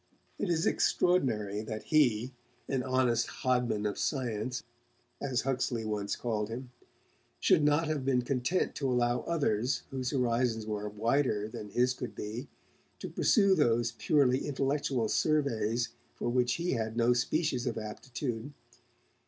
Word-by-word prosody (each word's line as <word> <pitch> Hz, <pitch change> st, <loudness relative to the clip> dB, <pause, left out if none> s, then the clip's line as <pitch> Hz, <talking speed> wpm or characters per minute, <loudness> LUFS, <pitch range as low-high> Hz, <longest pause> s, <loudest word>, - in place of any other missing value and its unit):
It 200 Hz, -, -1 dB
is 165 Hz, -1 st, +1 dB
extraordinary 110 Hz, -, +2 dB
that 110 Hz, -1 st, -5 dB
he 130 Hz, -5 st, +2 dB, 0.3 s
an 135 Hz, -2 st, 0 dB
'honest 130 Hz, -2 st, +1 dB, 0.2 s
hodman 125 Hz, -4 st, +1 dB
of 105 Hz, -, -2 dB
science', 125 Hz, -3 st, -2 dB, 0.6 s
as 130 Hz, -4 st, 0 dB
Huxley 125 Hz, -4 st, -1 dB
once 105 Hz, -2 st, -2 dB
called 110 Hz, -3 st, -2 dB
him 125 Hz, +2 st, -6 dB, 0.7 s
should -, -, +4 dB
not 150 Hz, +2 st, +3 dB
have 155 Hz, -3 st, -1 dB
been 130 Hz, -2 st, +2 dB
content 135 Hz, +8 st, 0 dB
to 135 Hz, -2 st, 0 dB
allow 120 Hz, -1 st, +2 dB
others, 130 Hz, -7 st, 0 dB
whose 130 Hz, -1 st, -2 dB
horizons 120 Hz, -4 st, +1 dB
were 105 Hz, -1 st, -3 dB
wider 110 Hz, 0 st, +1 dB
than 105 Hz, -1 st, -7 dB
his 125 Hz, +4 st, +2 dB
could 125 Hz, -2 st, -6 dB
be, 115 Hz, +6 st, -5 dB, 0.5 s
to -, -, -6 dB
pursue 200 Hz, -4 st, +4 dB
those 120 Hz, -7 st, +2 dB
purely 135 Hz, -3 st, +3 dB
intellectual 140 Hz, -3 st, 0 dB
surveys 120 Hz, -6 st, +1 dB, 0.3 s
for -, -, -2 dB
which 125 Hz, 0 st, +2 dB
he 170 Hz, +1 st, -1 dB
had 110 Hz, -2 st, -2 dB
no 120 Hz, +1 st, +4 dB
species 130 Hz, 0 st, 0 dB
of 120 Hz, -, -2 dB
aptitude. 120 Hz, +3 st, -5 dB
125 Hz, 140 wpm, -31 LUFS, 110-140 Hz, 0.7 s, should